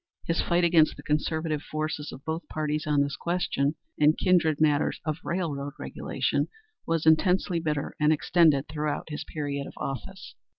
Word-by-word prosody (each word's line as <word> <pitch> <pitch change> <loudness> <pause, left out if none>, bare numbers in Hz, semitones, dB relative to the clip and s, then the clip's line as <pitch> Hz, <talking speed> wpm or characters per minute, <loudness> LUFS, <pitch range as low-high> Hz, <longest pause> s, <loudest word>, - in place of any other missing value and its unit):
His 165 - +1
fight 175 +1 +1
against 165 -2 +4
the - - -10
conservative 155 0 -1
forces 155 -1 -4
of 135 - -11
both 160 +2 -3
parties 155 0 -2
on 145 -1 +3
this 140 0 -1
question, 165 -4 0 0.2
and 150 +1 +5
kindred 170 -5 +3
matters 150 -1 +2
of 155 0 -2
railroad 145 -6 -2
regulation, - - -1 0.4
was 165 -1 0
intensely 180 +2 +3
bitter 150 -3 -2
and 150 0 +4
extended 155 -2 +3
throughout 150 +1 -3
his 150 - -4
period 140 -2 -4
of - - -10
office. 190 +8 -6
155 Hz, 160 wpm, -27 LUFS, 150-165 Hz, 0.4 s, and